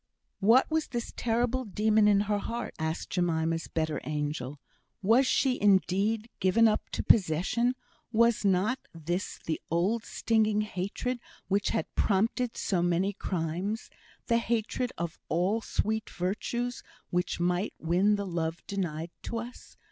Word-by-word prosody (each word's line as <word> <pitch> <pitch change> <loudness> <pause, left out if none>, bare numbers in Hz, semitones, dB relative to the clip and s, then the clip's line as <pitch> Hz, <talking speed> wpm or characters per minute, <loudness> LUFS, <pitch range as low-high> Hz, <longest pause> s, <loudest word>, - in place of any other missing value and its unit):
"What 225 +6 +6
was 315 -1 +1
this 240 -1 -4
terrible 245 +2 0
demon 215 0 +3
in 200 -1 +5
her 205 0 0
heart?" 235 +3 -4
asked 160 +1 -3
Jemima's 165 -2 0
better 160 -2 -2
angel. 150 -2 -3 0.4
"Was 235 +7 +5
she, 260 -1 +2
indeed, 205 +2 +3
given 215 +5 +5
up 215 -1 0
to - - -1
possession? 205 +7 +3 0.4
Was 235 0 +3
not 200 +6 +2 0.2
this 175 +4 -3
the 160 - -2
old 190 +8 +1
stinging 215 -3 +1
hatred 210 +5 -3 0.3
which 200 +1 +2
had 160 - 0
prompted 225 +4 +1
so 185 -4 0
many 175 +3 +1
crimes? 185 +5 -3 0.3
The 235 -1 +3
hatred 235 +2 -1
of 170 -1 -4
all 185 +7 +1
sweet 220 0 -1
virtues 235 +7 -2 0.3
which 180 0 0
might 180 +3 0
win 185 +6 +2
the 200 0 -3
love 170 -2 -3
denied 170 -4 -3
to 230 - -3
us? 240 +2 -8
200 Hz, 140 wpm, -29 LUFS, 175-230 Hz, 0.4 s, What